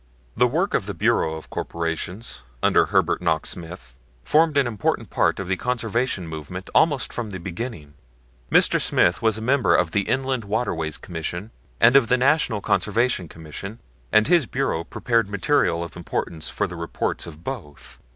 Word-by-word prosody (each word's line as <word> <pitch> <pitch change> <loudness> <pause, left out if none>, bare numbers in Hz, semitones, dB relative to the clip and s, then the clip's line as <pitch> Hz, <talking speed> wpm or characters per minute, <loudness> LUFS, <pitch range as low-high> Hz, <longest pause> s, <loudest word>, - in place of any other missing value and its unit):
The 125 - +4
work 170 +11 0
of 100 - 0
the 100 - -4
Bureau 105 -8 +1
of 80 - -10
Corporations, 85 +6 -4 0.2
under - - +5
Herbert - - +2
Knox 80 -3 0
Smith, 75 -8 -9 0.2
formed 155 -1 +3
an 140 - +4
important 110 -4 -1
part - - +2
of 95 - -4
the 95 - +1
Conservation 120 -3 -1
movement 80 +4 -7
almost 145 -5 +3
from 120 -3 -3
the 95 -2 -5
beginning. 85 - -6 0.6
Mr. - - +4
Smith 85 +1 +2
was 110 -2 +2
a 110 - -5
member 130 +2 +3
of 85 -2 +2
the 100 +2 0
Inland 130 -2 0
Waterways 85 -8 -2
Commission 90 +5 -5 0.3
and 120 +3 +6
of 135 -4 +6
the 125 - +3
National 130 -5 +2
Conservation 110 -3 +1
Commission 80 +7 -8 0.3
and 110 0 +5
his 170 -6 +3
Bureau 130 -11 -1
prepared 115 +2 0
material 95 -5 +1
of 85 -1 -8
importance 85 -2 -3
for - - -1
the 90 - -7
reports 85 0 -3
of 80 0 -11
both. 95 - -8
100 Hz, 170 wpm, -23 LUFS, 85-125 Hz, 0.6 s, and